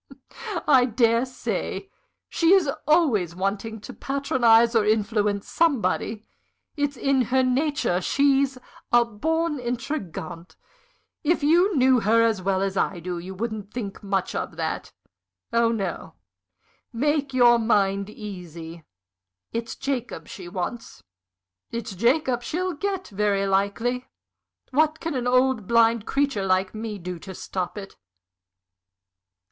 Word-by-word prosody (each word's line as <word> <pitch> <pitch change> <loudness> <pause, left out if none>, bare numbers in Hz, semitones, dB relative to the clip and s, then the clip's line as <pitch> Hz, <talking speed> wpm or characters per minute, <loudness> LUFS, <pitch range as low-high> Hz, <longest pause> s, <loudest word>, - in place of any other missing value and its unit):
"I 260 -4 +6
dare 235 +1 +2
say. 255 +8 -4 0.4
She 335 +2 +3
is 380 -6 +4 0.2
always 245 - +3
wanting 200 +4 -2
to - - -9
patronize 240 -4 +3
or 225 - +5
influence 210 -1 +1
somebody. 245 -8 0 0.5
It's 290 -2 -1
in 275 +1 +2
her 260 +3 +2
nature. 255 - +1
She's 275 +3 +2 0.3
a 240 0 +5
born 320 +7 -1
intrigante. 230 - -5 0.7
If 325 0 +1
you 345 +4 +4
knew 260 -1 +5
her 225 +2 +3
as 220 -4 +1
well 190 0 0
as 195 0 -2
I 185 - 0
do, 175 +1 -4
you 185 +2 -8
wouldn't 215 -1 -4
think 210 -5 -6
much 195 -2 -1
of - - -4
that. - - -3 0.6
Oh 230 0 +3
no 195 - -4 0.8
make 285 +3 0
your 240 -2 +5
mind 200 -3 +1
easy. 170 -6 -9 0.7
It's 230 0 -3
Jacob 260 -3 -4
she 180 -4 -9
wants 180 - -5 0.7
it's 230 -3 -5
Jacob 245 - +1
she'll 360 +8 -2
get, 385 +3 -3
very 200 -1 0
likely. 200 +6 0 0.6
What 310 +3 +2
can 330 -1 -3
an 250 -2 -2
old, 255 -4 +2
blind 230 -1 +3
creature 275 -7 0
like 185 0 +1
me 215 -1 -5
do 180 -1 -6
to 190 +2 -9
stop 185 +3 -4
it?" 195 -1 -9
230 Hz, 130 wpm, -24 LUFS, 200-270 Hz, 0.8 s, I